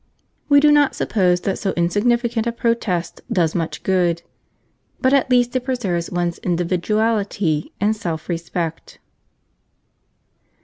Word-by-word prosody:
We 285 -1 +7
do 300 +1 +5
not 290 -1 +4
suppose 180 -4 +1
that 195 - -2
so 195 -3 -1
insignificant 230 +6 +1
a - - +1
protest 230 -7 -1
does 165 -4 +1
much 165 -2 -3
good, 175 -3 +1 0.8
but 260 0 +2
at 270 -2 +3
least 245 -1 +2
it 255 - 0
preserves 195 -10 -2
one's 175 -1 -2
individuality 185 -1 0
and 210 +2 +2
self 165 -6 -5
respect. 165 -1 -4
195 Hz, 125 wpm, -20 LUFS, 175-235 Hz, 0.8 s, We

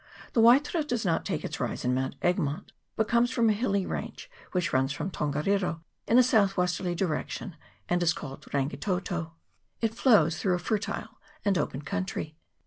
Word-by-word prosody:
The 230 - +4
Waitara 280 +8 +5
does 245 -7 -2
not 165 -2 +1
take - - -2
its - - -5
rise - - -3
in 125 - +2
Mount 130 +1 -1
Egmont, 175 -1 0 0.2
but 220 - +1
comes 235 +1 +3
from 235 -3 +3
a - - +3
hilly 200 -3 0
range - - -5 0.2
which 180 -3 -1
runs 130 +1 +2
from 160 +6 -3
Tongariro 165 +4 0 0.3
in 235 - +4
a 255 - +8
south 205 -6 +3
westerly 180 0 0
di 190 - +1
rection, 175 +3 -4 0.3
and 175 0 +1
is 170 -2 +4
called 135 -3 -7
Rangitoto. 165 +4 -2 0.5
It 225 -1 0
flows 195 - +4
through 185 -3 +2
a - - 0
fertile 205 +4 -3 0.3
and 200 -1 +3
open 145 -4 -2
country. 185 -5 -3
180 Hz, 180 wpm, -28 LUFS, 160-220 Hz, 0.5 s, a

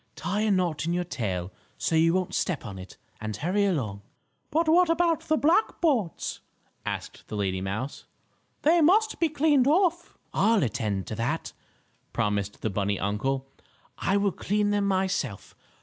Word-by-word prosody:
"Tie 200 +4 -2
a 215 - +2
knot 175 -5 +1
in 170 - +1
your 180 0 0
tail, 95 - -3 0.3
so - - -1
you 165 +1 +5
won't 185 -1 -1
step 160 -8 -1
on 100 -4 -7
it, 90 0 -11 0.2
and 110 -1 -4
hurry 190 - +1
along." 120 - -1 0.5
"But 320 +2 +1
what 345 +2 +5
about 330 -1 +3
the 310 - +3
black 335 +10 +2
boards?" 250 - 0 0.5
asked - - -5
the - - -6
lady 95 -2 -1
mouse. 105 +9 -4 0.6
"They 330 +3 +5
must 425 +8 +4
be 330 - +3
cleaned 290 -3 +3
off." 345 +2 +2 0.2
"I'll 220 -3 +3
attend 110 -5 -1
to 110 - -5
that," 130 +8 -2 0.6
promised 105 -1 -1
the 110 - 0
bunny 100 0 -1
uncle. 135 +7 -1 0.5
"I 195 - +2
will 200 -1 +2
clean 205 +3 0
them 205 -1 +1
myself. 185 - -1
175 Hz, 165 wpm, -27 LUFS, -, 0.6 s, you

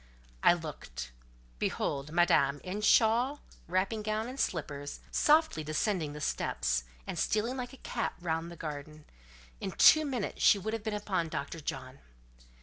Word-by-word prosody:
I - - +7
looked. 150 - -7 0.5
Behold 140 +1 -2
Madame, 145 -5 +3
in 195 +3 -4
shawl, 240 +6 +4 0.3
wrapping 190 +5 0
gown, 215 +1 -1
and 260 +2 -7
slippers, 145 -4 -3
softly 305 - +3
descending 155 0 -1
the 150 - -7
steps, - - -1 0.2
and - - -4
stealing 225 +4 0
like 250 -2 -5
a - - -11
cat 235 - -2
round 165 -1 -2
the - - -8
garden: 150 -1 -7 0.5
in 190 - -4
two 310 - +7
minutes 255 -8 -3
she - - +7
would 215 +3 -4
have 225 -2 -3
been 215 -1 -2
upon 190 -5 -1
Dr. 155 +2 -4
John. 135 -2 -6
175 Hz, 150 wpm, -31 LUFS, 150-220 Hz, 0.5 s, I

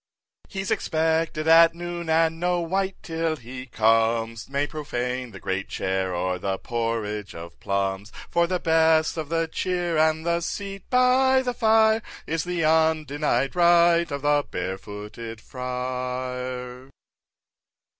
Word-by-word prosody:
5. - - -21
He's 195 -1 -3
expected 160 -1 0
at 165 0 +7
noon, 175 -1 -5
and 165 0 +2
no 175 0 +1
wight 190 +3 -1
till 165 -1 -1
he 125 -1 -9
comes 115 0 +1
May 140 +1 0
profane 125 -4 -4
the - - -11
great 95 +1 -3
chair, 95 0 -1
or 90 +1 -1
the 95 +1 -2
porridge 115 -4 -3
of 85 +1 -10
plums 100 +1 -2 0.2
For 170 0 +2
the 180 +1 0
best 160 -1 +3
of 155 -3 -5
the 165 0 0
cheer, 175 -1 -1
and 160 0 +2
the 170 0 +1
seat 195 +2 -5
by 260 +1 +4
the 250 -1 -1
fire, 220 -1 +4 0.2
Is 165 +1 -2
the 175 -2 -1
undenied 155 -4 +1
right 170 -1 +4
of 140 -1 -5
the 145 0 +3
Barefooted 105 +5 -6
Friar. 125 0 -5
155 Hz, 135 wpm, -24 LUFS, 115-170 Hz, 0.2 s, at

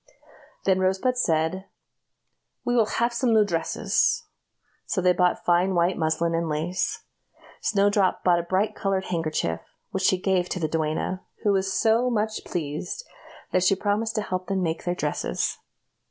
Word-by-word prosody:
Then 190 -1 +3
Rosebud 190 +7 +1
said: 170 -3 0 1.0
"We 245 - +1
will 225 -3 +4
have 235 +2 0
some 235 0 +1
new 215 -1 +5
dresses;" 170 -4 +1 0.6
so - - 0
they 180 0 +4
bought 180 0 +1
fine 180 +2 +3
white 175 +1 +2
muslin 160 +1 0
and 165 0 0
lace. 165 +5 -2 0.6
Snowdrop 200 -2 +2
bought 175 -1 +4
a - - 0
bright 190 +5 0
colored 195 -1 -1
handkerchief, 155 - -1 0.3
which 190 - -2
she 185 -1 +3
gave 185 -1 +1
the 170 -4 -1
duenna, 160 +4 -1 0.2
who 205 - +3
was 195 -1 +1
so 230 +5 +3
much 220 -2 -1
pleased 170 - -4 0.5
that 185 - +2
she 190 +1 +4
promised 215 +3 -1
to 215 - 0
help 185 -2 -3
them 195 -2 0
make 165 -1 -2
their 175 0 0
dresses. 150 -4 -2
185 Hz, 155 wpm, -25 LUFS, 170-205 Hz, 1.0 s, new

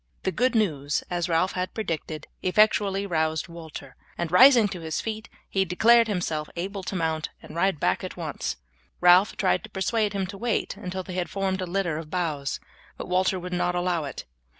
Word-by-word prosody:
The 190 - 0
good 250 +5 +1
news, 150 -10 +1
as 175 0 -1
Ralph 170 +3 +2
had 185 0 -3
predicted, 165 -7 -4 0.2
effectually 200 0 +3
roused 160 -3 0
Walter, 160 -5 -10 0.2
and 170 -2 -2
rising 240 +2 +8
to 185 - -6
his 160 -1 -3
feet 220 0 -5 0.2
he 195 - +1
declared 225 +6 +5
himself 165 -7 -2
able 195 +3 -4
to 190 - -5
mount 160 -3 -1
and 155 - -11
ride 180 -2 +1
back - - +1
at - - -6
once. - - -4 0.4
Ralph 180 +3 +5
tried 200 -3 +1
to 220 - -10
persuade 210 +1 0
him 195 -1 -1
to 195 +1 -8
wait 235 -1 -1
until 185 +1 -5
they 185 - -8
had 180 -1 -2
formed 195 -1 -1
a 185 - -3
litter 175 -4 -1
of 155 -2 -9
boughs, 155 -6 -2 0.4
but - - -7
Walter 185 +1 +2
would 180 0 -6
not 180 0 0
allow 175 -3 0
it. 140 - -7
180 Hz, 195 wpm, -26 LUFS, 165-200 Hz, 0.4 s, rising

